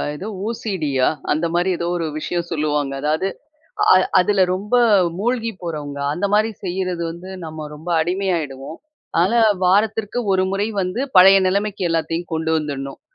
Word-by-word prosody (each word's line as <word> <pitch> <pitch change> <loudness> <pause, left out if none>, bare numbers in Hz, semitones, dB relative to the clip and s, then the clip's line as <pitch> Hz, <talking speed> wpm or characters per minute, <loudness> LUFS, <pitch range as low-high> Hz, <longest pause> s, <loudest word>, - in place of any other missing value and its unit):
எதோ 185 +8 -7 0.2
ஓசிடியா? 180 - -1 0.2
அந்த 155 +3 +1
மாரி 175 +2 +1
ஏதோ 170 - -3
ஒரு 165 - -2
விஷயம் 170 +2 -3
சொல்லுவாங்க. 150 -3 -1
அதாவது 155 +5 0 0.7
அ - - +7 0.2
அதில 190 +1 +3
ரொம்ப 205 +5 -3 0.4
மூழ்கி 230 +2 -1
போறவங்க. 150 -4 -5
அந்த 175 +6 -1
மாரி 215 +2 +3
செய்றது 180 -1 -2
வந்து 175 +3 -9
நம்ம 155 -1 -7
ரொம்ப 155 +4 -10
அடிமையாய்டுவோம். 165 -5 -2 0.4
அதனால 200 +7 +3 0.2
வாரத்திற்கு 210 +4 +1 0.2
ஒரு 185 0 +2
முறை 200 +2 0
வந்து 185 +7 -2
பழைய 190 +2 +9
நிலைமைக்கி 200 0 -1
எல்லாத்தையும் 165 +1 -2
கொண்டு 160 0 -1
வந்துடணும். 140 -3 -4
175 Hz, 140 wpm, -20 LUFS, 155-195 Hz, 0.7 s, பழைய